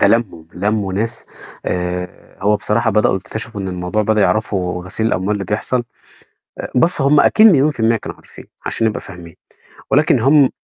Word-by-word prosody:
ده - - +5
لموا 110 -8 0
لموا 100 0 -1
ناس 110 +4 -1 0.4
آآ، 90 0 -4
هو 105 +1 +3
بصراحة 110 +2 0
بدأوا 105 -2 +2
يكتشفوا 110 +2 -4
إن 95 - -4
الموضوع 90 +3 -2
بدأوا 110 0 +1
يعرفوا 95 -4 0
غسيل 110 +4 -1
الأموال 95 0 0
اللي 100 -2 -3
بيحصل. 120 +5 0 0.8
آآ - - -6
بس 165 +4 +2
هُم 140 +2 +4
أكيد 220 +1 +6
مليون 155 -6 +4
في 145 - -14
المِيّة 115 +1 +3
كانوا - - -8
عارفين - - -15 0.2
عشان 115 - 0
نبقى 105 - -3
فاهمين. 85 -3 -12 0.6
ولكن 145 -3 +3
هُم 140 +2 +4
105 Hz, 175 wpm, -17 LUFS, 95-115 Hz, 0.8 s, أكيد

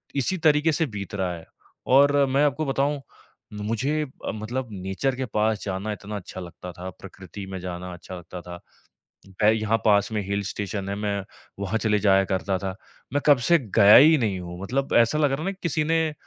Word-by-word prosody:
इसी 140 +7 0
तरीके 155 -1 +3
से 160 +2 +1
बीत 100 -6 -6
रहा 95 -3 -1
है। 80 - -11 0.4
और 140 +2 +5
मैं 135 +2 +2
आपको 145 +2 0
बताऊँ, 140 +1 0
म - - -11 0.7
मुझे 135 +7 0 0.2
अ, - - -1
मतलब 120 +4 -4
नेचर 95 +7 -2
के 130 0 -3
पास 110 -1 0
जाना 100 +2 -3
इतना 105 +2 -7
अच्छा 95 -2 -7
लगता 90 0 -9
था, 90 +1 -7
प्रकृति 95 +1 -10
में 95 - -4
जाना 90 0 -6
अच्छा 90 +1 -9
लगता 90 0 -9
था। 85 0 -9 0.8
मैं 105 - +7
यहाँ 110 0 +1
पास 105 0 +3
में 105 - -1
हिल 100 0 -1
स्टेशन 100 0 -4
है, 100 - -2
मैं 100 -1 -2 0.4
वहाँ 100 +2 -1
चले 105 -2 +1
जाया 95 -1 +4
करता 95 0 0
था। 95 0 -4 0.4
मैं 145 - +1
कब 145 -3 +7
से 170 - +7 0.2
गया 100 +1 +9
ही 155 +3 +8
नहीं 105 -7 -1
हूँ, 90 0 -8
मतलब 135 +7 -2
ऐसा 115 +6 +3
लग 145 -3 +2
रहा 135 - -1
है - - -4
ना 195 - 0
किसी 160 -2 0
ने 160 +1 +2
अ, - - -8
105 Hz, 210 wpm, -25 LUFS, 95-135 Hz, 0.8 s, गया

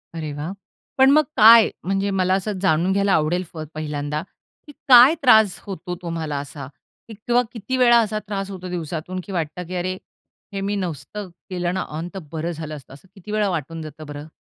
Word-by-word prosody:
अरे 155 -2 -4
वाह! 150 +5 -5 0.5
पण 265 0 +6
मग 305 +2 +5
काय 225 +1 +8
म्हणजे 195 +2 0
मला 185 0 +2
असं 195 +1 -1
जाणून 175 0 +2
घ्यायला 200 0 +2
आवडेल 175 +3 +1
प 160 - -8
पहिल्यांदा, 150 -1 -3 0.5
की - - -10 0.2
काय 255 +5 +9
त्रास 220 -7 +5
होतो 180 -2 -6
तुम्हाला 165 -4 -3
असा? 140 -1 -8 0.4
किंवा 235 +3 0
किती 235 +4 -3
वेळा 240 -2 +6
असा 215 -1 0
त्रास 195 -1 -3
होतो 185 -1 -7
दिवसातून 175 +1 -4
की 200 - -10
वाटतं 170 0 -3
की 185 - -6
अरे, 185 +1 -2 0.6
हे 195 - -3
मी 200 +1 -1
नसतं 185 +2 -5 0.2
केलं 180 -1 -2
ना 190 - -1 0.2
ऑन 165 +2 -4
तर 195 - -5
बरं 165 +2 -3
झालं 155 -1 -6
असतं. 135 -2 -12
असं 145 +7 -16
किती 195 +2 -10
वेळा 210 -1 +1
वाटून 165 -1 -4
जातं 155 0 -9
बरं? 145 +1 -8
180 Hz, 190 wpm, -22 LUFS, 155-205 Hz, 0.6 s, काय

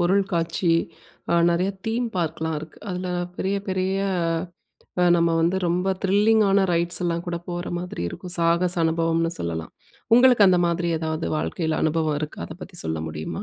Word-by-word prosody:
பொருள் 190 +3 +3
காட்சி 165 +1 +1 0.6
அ - - +4 0.2
நிறைய 180 +3 +1 0.2
தீம் 235 +2 0
பார்க்லாம் 160 -2 -1
இருக்கு. 155 +1 -11
அதில 180 0 -3 0.3
பெரிய 195 +1 -1
பெரிய 185 0 0 1.1
அ - - +5
நம்ம 170 0 +2
வந்து 170 +3 +2
ரொம்ப 180 +3 0
த்ரில்லிங் 210 +3 +4
ஆன 195 0 +4
ரைட்ஸ் 170 +1 0
எல்லாம் 170 0 -1
கூட 170 - -2
போற 175 0 -4
மாதிரி 180 - -5
இருக்கும். 180 - -5
சாகச 170 +2 +2
அனுபவம்ன்னு 165 0 +1
சொல்லலாம். 80 -1 -4 0.4
உங்களுக்கு 245 -4 +6
அந்த 180 -1 +4
மாதிரி 170 0 0
ஏதாவது 160 - -2
வாழ்க்கையில 155 - -2
அனுபவம் 155 -1 +1
இருக்கா? 155 -1 -5
அத 160 - -9
பத்தி 180 - -10
சொல்ல 80 0 -2
முடியுமா? 75 0 -5
170 Hz, 160 wpm, -24 LUFS, 160-185 Hz, 1.1 s, உங்களுக்கு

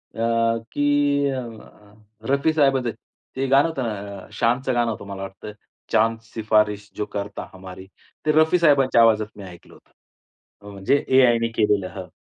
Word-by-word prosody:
अ, 115 0 +1
की 145 -1 +1
अ, 130 -3 -4 0.8
रफी 140 +3 +2
साहेबांचं 135 -5 +2 0.5
ते 135 +1 -1
गाणं 135 +3 +4
होतं 160 -5 -4
ना? 100 -3 -5
अ, - - -17
शानचं 125 +3 0
गाणं 120 -1 +1
होतं 105 - -7
मला 100 -1 -7
वाटतं. 95 +2 -8 0.4
चांद 115 +1 +2
शिफारिश 105 -2 0
जो 105 - -3
करता 100 0 -5
हमारी. 95 0 -11 0.4
ते 155 - +3
रफी 160 +3 +4
साहेबांच्या 140 -7 +4
आवाजात 110 -2 +4
मी 100 - -9
ऐकलं 90 -3 -13
होतं. - - -22 0.7
अ, 100 0 -11
म्हणजे 100 +8 +1
AI 130 -3 +5
ने 115 - +1
केलेलं 105 -3 +1
हं. 95 -2 -7
115 Hz, 160 wpm, -22 LUFS, 105-135 Hz, 0.8 s, AI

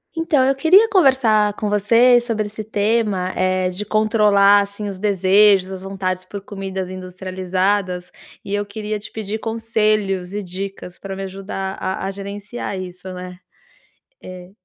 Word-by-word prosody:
Então, 325 -5 +2
eu 270 +1 +2
queria 365 +11 +5
conversar 255 - +3
com 210 0 -3
você 230 +4 +5
sobre 225 -3 -2
esse 210 +1 -7
tema, 210 -3 0
eh, 185 0 +1
de 185 +3 -4
controlar, 210 -2 +4
assim, 200 +1 -5
os 195 -2 -6
desejos, 195 -1 +4
as 190 -1 -6
vontades 190 -1 -3
por 200 +2 -7
comidas 190 -2 -5
industrializadas, 185 0 -2 0.3
e 195 - -5
eu 205 - 0
queria 210 +1 -4
te 205 - -10
pedir 220 0 -4
conselhos 215 -5 0
e 205 0 -3
dicas 185 0 -7
para 195 -1 -6
me 195 - -5
ajudar 195 0 -5
a 190 0 -3
a 195 - -2
gerenciar 200 +2 -6
isso, 185 0 -8
né. 180 0 -8 0.8
É 180 0 -10
200 Hz, 150 wpm, -20 LUFS, 185-215 Hz, 0.8 s, queria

